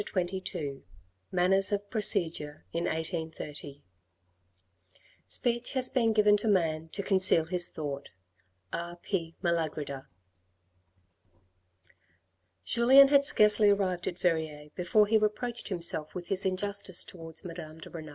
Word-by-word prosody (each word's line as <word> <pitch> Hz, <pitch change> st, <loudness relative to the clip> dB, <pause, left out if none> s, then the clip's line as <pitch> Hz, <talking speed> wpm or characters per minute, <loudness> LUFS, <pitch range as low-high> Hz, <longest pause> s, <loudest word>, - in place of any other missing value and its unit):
CHAPTER 185 Hz, 0 st, -2 dB
XXII 145 Hz, -7 st, -5 dB, 0.5 s
MANNERS 190 Hz, +2 st, +2 dB
OF 205 Hz, 0 st, -2 dB
PROCEDURE 165 Hz, -9 st, -1 dB
IN 170 Hz, +1 st, -1 dB
1830 160 Hz, -3 st, -5 dB, 1.4 s
Speech 240 Hz, 0 st, 0 dB
has 255 Hz, -1 st, +2 dB
been 240 Hz, -4 st, +2 dB
given 210 Hz, -1 st, +4 dB
to 210 Hz, -, -2 dB
man 165 Hz, -5 st, +1 dB
to 200 Hz, -, -3 dB
conceal 190 Hz, -5 st, +4 dB
his 175 Hz, +1 st, 0 dB
thought. 145 Hz, -2 st, -6 dB, 0.6 s
R. 170 Hz, 0 st, -4 dB
P. 170 Hz, -2 st, -4 dB
Malagrida. 155 Hz, -5 st, -2 dB, 2.6 s
Julien 265 Hz, -, +6 dB
had 280 Hz, 0 st, +5 dB
scarcely 210 Hz, -5 st, +5 dB
arrived 190 Hz, -3 st, 0 dB
at 175 Hz, -, -3 dB
Verrieres 160 Hz, -4 st, -2 dB
before 200 Hz, +4 st, +2 dB
he 220 Hz, +1 st, +3 dB
reproached 220 Hz, +3 st, -2 dB
himself 170 Hz, -4 st, -1 dB
with 175 Hz, -1 st, -7 dB
his 195 Hz, 0 st, +1 dB
injustice 190 Hz, -1 st, -1 dB
towards 165 Hz, 0 st, -7 dB
Madame 165 Hz, -2 st, -8 dB
de 160 Hz, -, -12 dB
Renal. 160 Hz, -2 st, -8 dB
180 Hz, 120 wpm, -29 LUFS, 160-205 Hz, 2.6 s, Julien